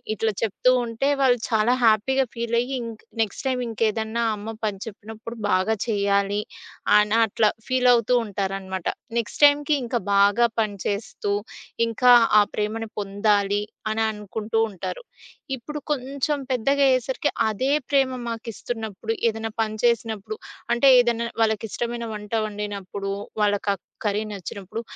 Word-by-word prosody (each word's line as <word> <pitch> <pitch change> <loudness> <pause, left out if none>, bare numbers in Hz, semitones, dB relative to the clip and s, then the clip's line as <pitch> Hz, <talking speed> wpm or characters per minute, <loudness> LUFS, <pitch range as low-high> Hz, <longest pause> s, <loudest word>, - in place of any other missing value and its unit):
ఇట్లా 220 0 0
చెప్తూ 225 +4 +2
ఉంటే 230 +4 -1
వాళ్ళు 250 -2 +4
చాలా 220 +3 +3
హ్యాపీగా 255 +5 +3
ఫీల్ 235 0 0
అయ్యి 260 +2 -3
ఇంక్ 225 -1 -9 0.2
నెక్స్ట్ 215 +5 -7
టైమ్ 250 -1 -1
ఇంకేదన్నా 225 +1 0
అమ్మ 205 +1 -8 0.2
పని 205 -2 -2
చెప్పినప్పుడు 220 +2 -9
బాగా 185 +4 +2
చేయాలి 200 -1 +1 0.6
అన 210 0 +3 0.2
అట్లా 215 +1 +2 0.2
ఫీలవుతూంటారనమాట. 210 -7 +1 0.3
నెక్స్ట్ 230 - -5
టైమ్‌కి 290 +1 +4
ఇంకా 240 0 -1
బాగా 205 +4 +5
పని 210 -2 0
చేస్తూ, 205 0 -3 0.5
ఇంకా 230 +2 +4 0.3
ఆ - - +7
ప్రేమను 220 +2 -2
పొందాలి 205 0 +1 0.3
అని 220 +1 0
అనుకుంటూ 210 +1 -4
ఉంటారు. 205 - -6 0.5
ఇప్పుడు 300 +5 -7
కొంచెం 280 +1 -1
పెద్దగా 275 +3 +1
అయ్యేసరికి 260 +2 +1 0.2
అదే 235 +6 -1 0.2
ప్రేమ 275 -2 +3 0.2
మాకిస్తున్నప్పుడు, 225 -1 -5 0.2
ఏదైనా 225 0 -2
పని 215 -1 -1
చేసినప్పుడు, 220 -3 0 0.4
అంటే 240 +3 +4
ఏదైనా 235 -1 +2
వాళ్ళకిష్టమైన 225 +2 -1
వంట 210 +1 -8
వండినప్పుడు, 200 -2 -5 0.3
వాళ్ళక 205 -1 +1 0.3
కర్రీ 210 0 0
నచ్చినప్పుడు 200 +2 -6
220 Hz, 125 wpm, -24 LUFS, 205-240 Hz, 0.6 s, ఆ